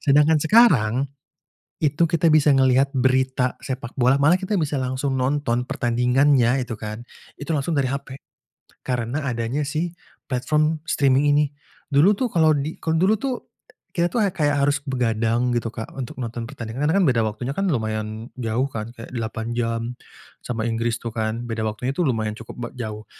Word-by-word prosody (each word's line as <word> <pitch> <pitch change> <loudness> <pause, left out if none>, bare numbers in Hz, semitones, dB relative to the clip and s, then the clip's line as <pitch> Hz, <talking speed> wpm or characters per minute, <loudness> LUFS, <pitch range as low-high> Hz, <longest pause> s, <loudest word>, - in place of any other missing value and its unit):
Sedangkan 150 +2 +4
sekarang, 160 - +5 0.9
itu 150 +2 +2
kita 170 0 +2
bisa 150 -1 +5
melihat 130 +1 +4
berita 130 0 +1
sepak 130 -2 -5
bola, 130 +2 +4
malah 145 +5 +5
kita 195 +2 -2
bisa 150 -2 -1
langsung 130 +1 -1
nonton 130 -2 0
pertandingannya 125 0 +3
itu 120 -2 -5
kan, 110 +2 -6 0.4
itu 145 - -4
langsung 145 +3 -1
dari 135 -2 +2
HP 140 0 -5 0.7
karena 125 +3 -2
adanya 120 +4 -1 0.6
platform 150 +4 0
si - - -3
streaming 140 0 +3
ini. 150 +1 +4 0.5
Dulu 145 +8 +5
tuh 255 - +1
kalau 160 -3 +4
di 145 +3 -3
dulu 170 +6 +2
tuh 255 +1 -4 0.4
kita 175 0 +2
tuh 225 -3 +2
ya 190 - -2
kayak 145 -4 +1
harus 145 0 +1
begadang 120 -2 0
gitu, 120 -1 -1
Kak, 110 - -5
untuk 130 -3 -6
nonton 120 -1 -4
pertandingan, 130 +1 -3
karena 195 - +3
beda 125 -5 +3
waktunya 115 +5 -4
kan 195 +2 0
lumayan 110 -2 -3
jauh, 120 +1 0
kan? 110 -1 -5
Kayak 115 - -10
8 110 -1 -3
jam 115 -1 -1 0.6
sama 115 -3 -3
Inggris 115 +1 -1
tuh 115 - -4
kan 110 +1 -2
beda 115 -1 -3
waktunya 110 +4 -2
lumayan 115 -11 0
cukup 115 - -10
b 120 - -3
jauh. 110 -3 -5
130 Hz, 165 wpm, -23 LUFS, 115-145 Hz, 0.9 s, sekarang